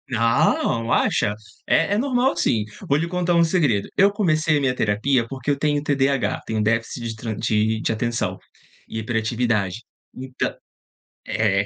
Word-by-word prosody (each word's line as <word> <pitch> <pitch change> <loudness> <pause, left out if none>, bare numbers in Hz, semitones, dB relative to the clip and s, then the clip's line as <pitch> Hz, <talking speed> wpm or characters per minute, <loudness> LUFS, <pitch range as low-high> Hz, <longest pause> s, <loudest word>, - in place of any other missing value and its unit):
Ah, 115 +1 +2
acha? 105 0 0 0.3
É 165 +5 +2
é - - +2
normal 250 -2 +1
sim. 110 -10 +1 0.2
Vou 140 - +3
lhe 165 +2 -1
contar 175 -1 0
um 170 - +5
segredo. 150 - +1
Eu 200 +1 +5
comecei 155 -7 +1
minha 130 -2 0
terapia 115 +3 +1
porque 135 +2 -3
eu 140 - 0
tenho 145 0 0
TDAH, 140 -2 0
tenho 110 -1 -1
déficit 115 +2 -1
de 110 - -5
tra 110 0 -4
de 110 +2 0
atenção 120 +1 -2 0.5
e 110 - -5
hiperatividade. 110 -2 -1 0.3
Então 130 0 -3 0.8
É. 100 -3 +1
125 Hz, 150 wpm, -22 LUFS, 110-155 Hz, 0.8 s, um